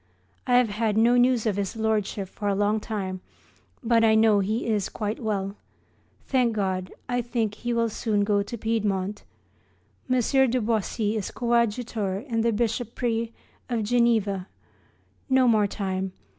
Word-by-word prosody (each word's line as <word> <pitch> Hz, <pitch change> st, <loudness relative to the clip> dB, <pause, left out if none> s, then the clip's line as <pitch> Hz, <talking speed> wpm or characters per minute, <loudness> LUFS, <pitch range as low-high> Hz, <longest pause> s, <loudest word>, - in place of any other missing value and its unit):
I 245 Hz, -1 st, +5 dB
have 250 Hz, -3 st, +3 dB
had 215 Hz, 0 st, 0 dB
no 235 Hz, +2 st, +5 dB
news 245 Hz, -2 st, +3 dB
of 210 Hz, -3 st, 0 dB
his 200 Hz, 0 st, -2 dB
Lordship 215 Hz, -3 st, -1 dB
for 205 Hz, +2 st, -5 dB
a 200 Hz, -, +2 dB
long 205 Hz, +2 st, +1 dB
time, 195 Hz, -4 st, -4 dB, 0.6 s
but 230 Hz, -1 st, +3 dB
I 220 Hz, -1 st, +5 dB
know 220 Hz, -2 st, +5 dB
he 215 Hz, +4 st, -1 dB
is 210 Hz, -4 st, 0 dB
quite 210 Hz, 0 st, -3 dB
well. 200 Hz, -2 st, -2 dB, 0.7 s
Thank 250 Hz, -3 st, +2 dB
God, 190 Hz, -3 st, -2 dB, 0.2 s
I 245 Hz, 0 st, 0 dB
think 230 Hz, -3 st, -1 dB
he 240 Hz, +3 st, -4 dB
will 230 Hz, -1 st, +2 dB
soon 215 Hz, -1 st, 0 dB
go 205 Hz, 0 st, +2 dB
to 205 Hz, +4 st, -5 dB
Piedmont. 205 Hz, -3 st, -1 dB, 0.9 s
M. 255 Hz, -, +3 dB
de 255 Hz, 0 st, +2 dB
Boisy 220 Hz, -1 st, -1 dB
is 205 Hz, -, -3 dB
coadjutor 235 Hz, -4 st, 0 dB
in 230 Hz, -3 st, 0 dB
the 230 Hz, +1 st, +2 dB
bishopric 230 Hz, +1 st, -1 dB, 0.4 s
of 235 Hz, -3 st, 0 dB
Geneva. 215 Hz, -5 st, +1 dB, 0.8 s
No 260 Hz, -1 st, +4 dB
more 215 Hz, -3 st, +4 dB
time. 190 Hz, -2 st, -3 dB
220 Hz, 155 wpm, -25 LUFS, 205-235 Hz, 0.9 s, I